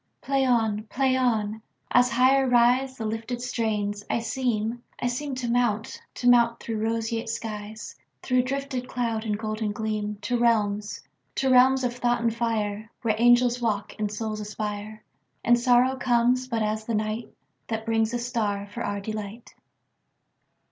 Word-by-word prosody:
Play 270 -1 +1
on! 220 -4 +1
Play 260 +3 +1
on! 220 -4 0 0.3
As 245 0 +5
higher 260 +2 +4
riseThe 245 0 +3
lifted 225 +3 -4
strains, 210 -4 -2
I - - +1
seem, 230 -1 -1 0.2
I - - -3
seemTo 255 0 -2
mount, 235 -2 0
to 245 - -2
mount 235 -1 +5
through 225 -2 -4
roseate 225 +1 -1
skies, 215 -1 -6 0.3
Through 255 -1 +3
drifted 270 -1 -3
cloud 230 -3 -2
and 210 -1 -1
golden 215 0 -2
gleam, 210 -1 -3
To 245 -1 0
realms, 210 -3 +1 0.3
to 265 -1 +1
realms 260 +1 +5
of 245 -1 -1
thought 240 -1 +1
and 230 -1 +1
fire, 220 -2 -2
Where 225 -2 +2
angels 240 +1 +4
walk 210 -3 -1
and 210 -1 -1
souls 215 0 -3
aspire, 210 0 -5 0.4
And 240 +1 +4
sorrow 250 +1 +4
comes 245 +1 +2
but 230 -3 -1
as 215 +1 -2
the 230 - -2
nightThat 220 +1 -5
brings 225 -1 +1
a 240 - -1
star 225 -5 -2
for 235 +3 -5
our 205 0 -2
delight. 215 +2 -6
230 Hz, 150 wpm, -26 LUFS, 215-245 Hz, 0.4 s, As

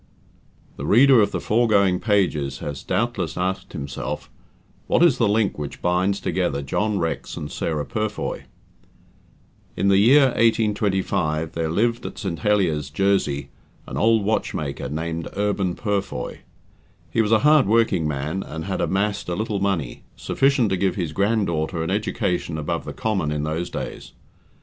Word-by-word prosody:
The - - -5
reader 130 +2 +6
of 100 - +3
the - - -3
foregoing 105 -5 +2
pages 80 - +1
has 70 -2 -6
doubtless 100 -8 -2
asked 95 +1 -2
himself, 70 0 -5 0.6
"what - - +3
is 165 -8 +4
the 115 - +3
link 105 -5 +1
which 75 -1 -6
binds 90 +3 +1
together 85 -6 -1
John 105 +9 0
Rex 85 -3 -3
and 75 - -6
Sarah 75 -3 -2
Purfoy?" 110 +3 -3 1.3
In 100 - +2
the 95 0 +5
year 135 +6 +6
1825 100 -9 +1
there 80 -1 -2
lived 115 +8 +1
at - - -9
St. 95 -6 -4
Heliers, 85 -9 +1
Jersey, 75 -6 0 0.4
an - - -7
old 110 -1 +3
watchmaker, 75 -11 -2
named 80 +2 -3
Urban 100 -3 0
Purfoy. 100 - -3 0.7
He 115 - +2
was 110 -1 0
a 110 - +6
hard 150 -7 +6
working 110 -7 +2
man, 75 +5 -2
and 80 -2 -6
had 95 -1 -2
amassed 100 0 -1
a 85 - -1
little 105 0 -2
money 95 -10 -1
sufficient 135 -5 +1
to 95 - +1
give 95 0 0
his 85 -5 -3
grand 105 +4 +1
daughter 80 0 -2
an 80 - -2
education 90 -5 -1
above 75 - -3
the - - -6
common 100 -8 -1
in 75 -1 -2
those 80 +3 -2
days. - - -6
95 Hz, 155 wpm, -23 LUFS, 80-105 Hz, 1.3 s, reader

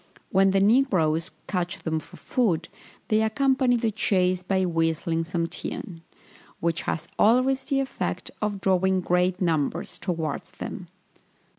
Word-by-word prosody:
When 195 +1 +5
the 195 0 +3
negroes 195 - +3 0.2
catch 185 0 -3
them 160 -1 0
for - - -14
food, 180 -10 0 0.4
they 215 0 +3
accompany 255 +2 +2
the 225 -2 0
chase 185 -3 +1
by 190 0 +1
whistling 165 0 0
some 170 0 -1
tune, 165 0 -6 0.6
which 165 -1 0
has 160 - -3
always 255 +4 +4
the 275 -2 +1
effect 265 - -3
of 205 -2 -2
drawing 190 0 +2
great 180 +1 +1
numbers 165 0 -1
towards 165 -5 -3
them. - - -7
185 Hz, 135 wpm, -26 LUFS, 170-215 Hz, 0.6 s, When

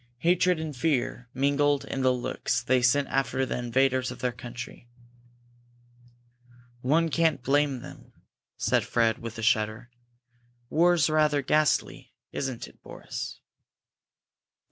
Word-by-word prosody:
Hatred 180 +1 +3
and 155 -2 -5
fear 125 -3 -1
mingled 140 +2 +1
in 135 - -3
the 130 0 +4
looks 125 -1 -2
they 130 +1 +2
sent 135 +3 +3
after 135 -1 0
the 125 - -3
invaders 130 +1 +1
of - - -7
their 125 0 -1
country. 120 0 -9 1.9
"One 160 +6 +2
can't 160 -4 +1
blame 140 -1 +1
them," - - -12 0.5
said - - +1
Fred, 115 -1 +1
with 115 0 -7
a 115 - -5
shudder. 110 +2 0 0.8
"War's 170 0 +4
rather 150 -2 +2
ghastly, 150 +2 +1 0.2
isn't 130 -4 -4
it, - - -19
Boris?" - - -7
130 Hz, 120 wpm, -27 LUFS, 120-150 Hz, 1.9 s, the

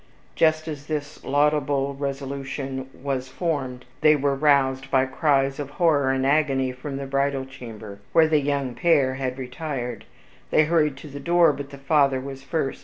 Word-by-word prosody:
Just 155 0 +2
as 150 -2 -6
this 150 -2 -4
laudable 145 -1 +1
resolution 135 -1 -4
was 135 -2 -4
formed, 130 -4 -3 0.2
they 155 0 +6
were 140 -1 +1
roused 135 -2 +2
by 130 -1 +3
cries 135 0 +1
of 145 -2 -4
horror 150 -6 +3
and 135 0 0
agony 135 -3 +2
from 135 +2 -6
the 140 - -4
bridal 140 0 0
chamber, 110 -6 -10
where 160 -1 +5
the 155 -2 +3
young 140 -3 -1
pair 140 -4 +3
had 130 -1 -3
retired. 125 -2 -5 0.4
They 155 - +4
hurried 150 -4 +2
to 150 - -10
the 140 0 -8
door, 170 +1 +4
but 140 0 -7
the 140 - -10
father 140 -1 +2
was 135 0 -7
first. 135 0 -2
140 Hz, 170 wpm, -24 LUFS, 135-150 Hz, 0.4 s, they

